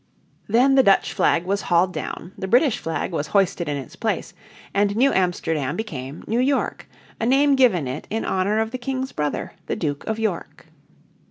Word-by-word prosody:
Then 250 +6 +4
the 270 - +7
Dutch 195 -6 +3
flag 170 +1 +2
was 200 +2 0
hauled 180 +1 +2
down, 180 - -6
the 190 - -5
British 245 +4 +3
flag 165 +3 -3
was 150 -3 -2
hoisted 180 -4 +1
in 145 - -1
its 135 -3 -8
place, - - -2 0.4
and 200 0 +2
New 270 +5 +3
Amsterdam 165 -6 0
became 145 - -6
New 230 +2 0
York, 270 +2 0 0.3
a 225 - -1
name 275 +2 +4
given 215 - +3
it 130 +4 -5
in 225 +1 -2
honour 190 +3 0
of 220 0 0
the 255 - -4
King's 260 +1 -3
brother, 150 -1 -3
the - - -1
Duke 145 -3 -3
of 220 - -1
York. 215 -6 -3
200 Hz, 185 wpm, -23 LUFS, 165-245 Hz, 0.4 s, the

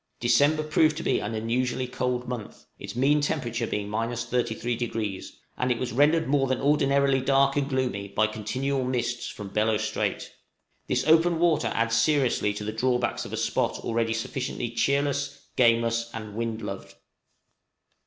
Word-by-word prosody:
December 145 +6 +3
proved 155 0 +2
to - - -4
be - - +1
an 110 +2 -4
unusually 125 +3 -1
cold 125 0 -2
month, 120 -4 -7
its - - -7
mean 145 +4 +3
temperature 120 -6 -1
being 105 -1 -3
33°; 115 -1 -2 0.3
and 125 0 +1
it 120 - +1
was 125 +1 -3
rendered 150 +5 +3
more 135 0 +2
than 130 -1 0
ordinarily 140 -1 +3
dark 135 +1 +3
and 140 -1 0
gloomy 125 -7 -1
by 110 +2 +1
continual 130 +6 -2
mists 120 -1 -2
from 105 -2 -7
Bellot 105 0 +2
Strait. - - -2 0.5
This - - 0
open 165 +2 +4
water 165 -2 +2
adds 115 0 +1
seriously 125 -3 +2
to 105 - -5
the 110 +1 -4
drawbacks 125 0 0
of - - -8
a - - -2
spot - - 0
already 115 0 0
sufficiently 120 0 -3
cheerless, 140 +2 0
gameless, 115 -1 +2
and 110 -2 -7
"wind 115 0 -3
loved." 100 0 -7
125 Hz, 155 wpm, -26 LUFS, 115-140 Hz, 0.5 s, open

